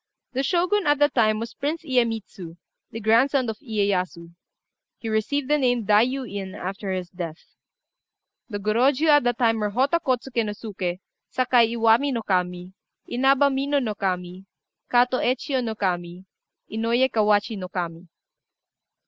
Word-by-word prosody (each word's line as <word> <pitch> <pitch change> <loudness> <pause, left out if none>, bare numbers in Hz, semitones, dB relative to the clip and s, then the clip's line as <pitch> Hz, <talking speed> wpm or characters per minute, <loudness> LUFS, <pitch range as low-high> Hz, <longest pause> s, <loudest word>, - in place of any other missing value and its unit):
The 260 - 0
Shogun 360 +6 +1
at 290 0 +4
that 290 +1 +3
time 215 -3 +3
was 230 +1 -5
Prince 310 +4 -3
Iyémitsu, 225 - -2 0.3
the 225 - -7
grandson 245 +5 +3
of 215 - -11
Iyéyasu. 190 - -2 0.6
He 225 - -6
received 255 +6 -1
the 300 +1 +2
name 245 -3 +2
of - - -9
Dai 210 +1 +5
yu 260 +3 -1
In 200 -5 -6
after 195 +2 -5
his 185 -2 -4
death. 170 -3 -7 1.0
The 205 - -3
Gorôjiu 255 +9 +2
at 290 -2 +6
that 245 -1 +1
time 225 -2 +2
were 210 -1 0
Hotta 270 +10 +1
Kôtsuké 255 -4 -1
no 210 -1 -3
Suké, 190 -4 -5 0.3
Sakai 245 -3 +3
Iwami 230 +5 +3
no 230 -2 -2
Kami, 180 -1 -2 0.3
Inaba 270 +3 +3
Mino 275 +2 0
no 240 -6 -1
Kami, 185 -2 -3 0.5
Katô 250 +1 +3
Ecchiu 255 +1 0
no 225 -2 -3
Kami, 180 -2 -3 0.5
Inouyé 230 +4 +2
Kawachi 210 0 +2
no 185 -2 -6
Kami. 175 -1 -5
225 Hz, 155 wpm, -24 LUFS, 195-260 Hz, 1.0 s, at